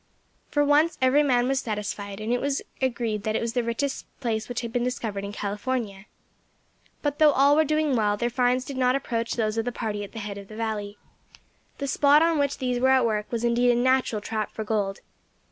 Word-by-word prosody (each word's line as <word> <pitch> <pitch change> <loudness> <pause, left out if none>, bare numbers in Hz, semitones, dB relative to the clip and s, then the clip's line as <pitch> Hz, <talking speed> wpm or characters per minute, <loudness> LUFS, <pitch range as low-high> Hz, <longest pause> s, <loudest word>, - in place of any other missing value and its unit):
For 290 0 +2
once 300 +3 +3
every 260 +3 +4
man 250 -4 +2
was 270 0 +1
satisfied, 205 -2 -4
and 220 +3 -1
it 245 - 0
was 280 0 -1 0.2
agreed 235 -5 -1
that 215 +1 -2
it - - +2
was 230 0 -3
the 245 -1 0
richest 250 +4 -2
place 225 -3 -2
which 245 - -3
had 230 -1 -6
been 245 - 0
discovered 225 -5 -3
in 200 - -5
California. 205 0 -3 1.0
But 290 -1 -1
though 305 -2 +6
all 280 +2 +5
were 315 - +5
doing 305 -2 +1
well, 210 -2 +1
their 240 +2 -1
finds 250 +1 +1
did 275 - -6
not 255 0 +3
approach 235 -4 -2
those 220 -1 0
of 225 - -1
the 245 - -1
party 215 -3 -3
at 200 - -9
the - - -9
head 205 -2 -5
of 200 - -11
the 215 - -11
valley. 215 -2 -3 0.8
The 280 - -3
spot 285 +3 +4
on 330 -2 +2
which 280 -1 0
these 250 -1 -1
were 260 +1 +3
at 260 -2 +4
work 210 -2 -1
was 235 -1 -2
indeed 240 +1 +3
a 240 - +4
natural 255 -3 +2
trap 215 0 -3
for 220 - -5
gold. 205 -2 -2
240 Hz, 225 wpm, -25 LUFS, 215-265 Hz, 1.0 s, though